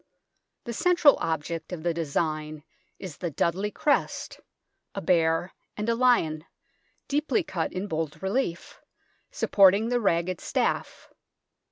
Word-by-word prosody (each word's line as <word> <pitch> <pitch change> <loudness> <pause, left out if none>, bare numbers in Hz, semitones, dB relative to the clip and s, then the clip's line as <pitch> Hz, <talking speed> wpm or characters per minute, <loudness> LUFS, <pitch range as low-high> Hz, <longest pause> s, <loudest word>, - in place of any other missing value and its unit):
The 235 - -5
central 345 +1 +5
object 160 +1 -3
of 170 -3 -6
the 170 -1 +1
design 155 -1 -2 0.3
is 185 -6 -8
the 175 - -3
Dudley 175 +7 -1
crest, 285 +7 -1 0.6
a - - -2
bear 165 0 +1 0.2
and 210 +1 -3
a - - +3
lion, 230 -11 +2 0.6
deeply 300 +7 0
cut 170 - -3
in 185 +2 -4
bold 160 -5 -3
relief, 190 -4 -2 0.5
supporting 200 +3 +4
the 245 -1 +1
ragged 175 -2 0
staff. - - -2
180 Hz, 125 wpm, -26 LUFS, 160-230 Hz, 0.6 s, central